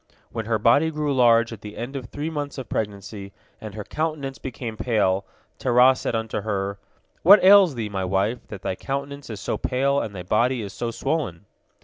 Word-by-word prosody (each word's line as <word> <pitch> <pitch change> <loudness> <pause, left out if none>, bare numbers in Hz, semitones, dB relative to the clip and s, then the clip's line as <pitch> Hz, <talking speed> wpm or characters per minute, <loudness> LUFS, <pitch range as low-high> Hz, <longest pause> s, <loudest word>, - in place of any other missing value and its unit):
When 115 -2 -4
her 115 -1 +2
body 120 +9 +4
grew 150 -2 -1
large 115 -2 +4
at 110 - -10
the 105 0 -9
end 125 +4 -5
of 130 -3 -4
three 150 +6 -4
months 145 -2 -4
of 130 -4 -6
pregnancy, 100 -1 -5 0.3
and 105 -2 -8
her 105 - -5
countenance 150 -1 -3
became 120 -3 -6
pale, 100 -5 +1 0.3
Terah 125 +1 +5
said 120 - -3
unto 110 -1 -2
her, 100 -1 -3 0.4
"What 200 +4 +8
ails 190 -5 +7
thee, 115 -3 -3
my 95 -2 -2
wife, 100 +6 -1
that 100 -2 -9
thy - - -1
countenance 140 +5 -5
is 110 -3 -6
so - - -3
pale 140 +2 +1
and 105 -2 -5
thy 90 - -6
body 115 +3 +1
so 120 +4 -4
swollen?" 125 - -3
115 Hz, 195 wpm, -24 LUFS, 105-140 Hz, 0.4 s, What